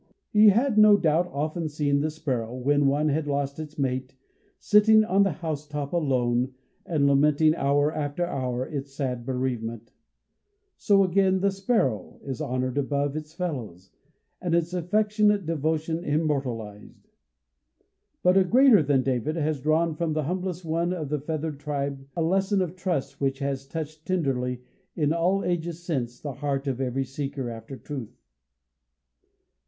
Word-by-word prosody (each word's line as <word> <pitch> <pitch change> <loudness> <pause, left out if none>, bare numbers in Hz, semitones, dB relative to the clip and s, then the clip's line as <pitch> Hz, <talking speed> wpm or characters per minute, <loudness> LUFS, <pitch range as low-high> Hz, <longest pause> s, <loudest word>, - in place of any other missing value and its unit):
He 210 0 +7
had, 230 +2 +3
no 210 -1 +8
doubt, 170 0 +2
often 155 +3 -2
seen 145 -1 0
the 155 +2 0
sparrow, 130 -7 -3
when 140 +2 +2
one 145 +3 +2
had 150 +1 -1
lost 140 0 -2
its 155 -1 -8
mate, 130 -1 -2 0.4
sitting 215 +1 +5
on 200 -1 +2
the 195 -1 +3
housetop 150 -3 -5
alone, 130 -5 +1 0.3
and 155 -4 +1
lamenting 150 +2 +4
hour 145 0 +1
after 150 +3 -2
hour 130 -5 -2
its 140 -2 -6
sad 125 -3 -3
bereavement. 120 -3 -3 0.8
So 200 -2 +3
again 190 0 +2
the 200 0 +2
sparrow 190 - -1
is 135 +2 -5
honored 130 -1 -1
above 140 +1 -1
its 155 +1 -7
fellows, 115 - -5 0.5
and 175 -2 0
its 170 +1 0
affectionate 210 +2 +2
devotion 160 +1 -1
immortalized. 135 - -3 1.1
But 180 +1 +5
a 190 - +6
"Greater 245 +1 +6
than 140 -3 +2
David," 135 +4 -1
has 155 -3 -1
drawn 160 +3 +2
from 160 0 -2
this 155 -2 -1
humblest 180 +1 -3
one 170 +2 0
of 155 -6 -4
the 150 0 -1
feathered 155 0 -4
tribe, 140 -2 -4
a 170 - 0
lesson 190 +3 +2
of 175 0 -6
trust 160 -7 -3
which 135 -1 0
has 135 -1 -3
touched 155 +1 -6
tenderly, 125 -8 -1 0.3
in 150 -1 +1
all 180 +4 +1
ages 170 -1 -2
since, 125 -8 -3
the 145 -2 -5
heart 140 +1 -2
of 135 -2 -2
every 135 +1 -1
seeker 135 -1 -4
after 115 +4 -8
truth. 130 -1 -8
150 Hz, 150 wpm, -26 LUFS, 135-170 Hz, 1.1 s, no